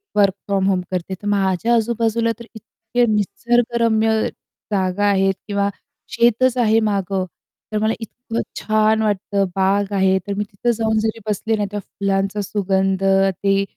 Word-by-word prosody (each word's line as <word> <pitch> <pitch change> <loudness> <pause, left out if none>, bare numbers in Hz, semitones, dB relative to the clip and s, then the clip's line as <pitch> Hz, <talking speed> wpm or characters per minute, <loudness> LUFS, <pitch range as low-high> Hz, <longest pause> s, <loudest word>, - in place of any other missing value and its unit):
work 200 -2 +4
from 195 -1 +1
home 185 -2 +1
तर 185 +2 -4
माझ्या 200 +2 +1
आजूबाजूला 230 0 +1
तर 235 - -9
इतके 225 +2 -2
निसर्गरम्य 230 +1 +1 0.6
जागा 190 +1 +1
आहेत 195 -1 +3
किंवा 200 -1 0 0.4
शेतच 240 +2 +3
आहे 225 -2 +4
मागं, 195 -3 -1 0.5
तर 215 - -1
मला 220 +1 +2
इतकं 230 +1 -5 0.2
छान 215 0 +2
वाटतं, 200 -1 0
बाग 195 +1 +1
आहे 190 -1 +3
तर 200 - -1
मी 210 - 0
तिथं 205 +4 -2
जाऊन 220 -1 0
जरी 220 +1 -1
बसले 220 +2 0
ना 205 - 0
त्या 205 - -3
फुलांचा 195 +1 -2
सुगंध, 195 -1 0
ते 195 0 +2
205 Hz, 145 wpm, -20 LUFS, 195-225 Hz, 0.6 s, work